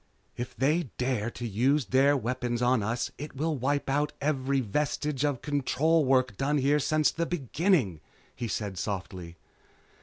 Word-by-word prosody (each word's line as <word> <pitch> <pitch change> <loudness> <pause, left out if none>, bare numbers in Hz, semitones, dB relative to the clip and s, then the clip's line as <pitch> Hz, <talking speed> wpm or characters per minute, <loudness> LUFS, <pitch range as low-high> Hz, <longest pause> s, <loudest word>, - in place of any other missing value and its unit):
"If 120 +1 -6
they 150 +2 +1
dare 125 -3 0
to 120 0 -6
use 130 +7 +2
their 135 +6 +4
weapons 120 -1 -2
on 125 -1 +3
us 115 +4 -2
it 150 0 -7
will 155 +3 -1
wipe 140 +2 -1
out 145 +2 0
every 140 -2 0
vestige 145 +4 -1
of 145 -4 -1
control 150 +2 +2
work 130 -4 +2
done 145 +5 +1
here 145 +2 +3
since 155 +1 +2
the 170 0 -2
beginning," 145 - +1 0.3
he 120 -2 -4
said 100 -4 -3
softly. 90 -4 -5
135 Hz, 155 wpm, -28 LUFS, 120-150 Hz, 0.3 s, their